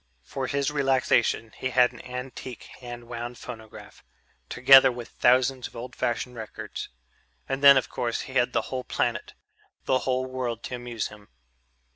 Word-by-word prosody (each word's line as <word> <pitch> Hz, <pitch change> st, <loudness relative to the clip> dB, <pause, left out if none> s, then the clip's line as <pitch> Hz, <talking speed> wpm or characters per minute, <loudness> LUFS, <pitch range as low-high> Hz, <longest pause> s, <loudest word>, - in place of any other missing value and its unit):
For 130 Hz, -, -4 dB
his 140 Hz, +2 st, 0 dB
relaxation 130 Hz, -5 st, +1 dB
he 130 Hz, -, -3 dB
had 125 Hz, -1 st, +4 dB
an 125 Hz, -, -12 dB
antique 125 Hz, 0 st, -7 dB, 0.2 s
hand 120 Hz, -1 st, -9 dB
wound 120 Hz, 0 st, -6 dB
phonograph, 110 Hz, -3 st, -11 dB, 0.5 s
together 135 Hz, +1 st, +7 dB
with 120 Hz, -1 st, -8 dB
thousands 130 Hz, +1 st, +2 dB
of -, -, -19 dB
old 120 Hz, +2 st, -8 dB
fashioned 125 Hz, 0 st, -2 dB
records. 110 Hz, -2 st, -7 dB, 0.6 s
And 135 Hz, +1 st, -3 dB
then, 140 Hz, -1 st, +10 dB
of 130 Hz, -, +1 dB
course, 120 Hz, -1 st, -2 dB
he 130 Hz, -, -9 dB
had 125 Hz, -2 st, +2 dB
the -, -, +1 dB
whole 130 Hz, -1 st, -2 dB
planet, -, -, -2 dB, 0.5 s
the 130 Hz, -, +2 dB
whole 130 Hz, 0 st, -1 dB
world 125 Hz, -3 st, -4 dB
to 125 Hz, -, -4 dB
amuse 120 Hz, -3 st, -4 dB
him. 105 Hz, -1 st, -15 dB
125 Hz, 160 wpm, -26 LUFS, 120-130 Hz, 0.6 s, then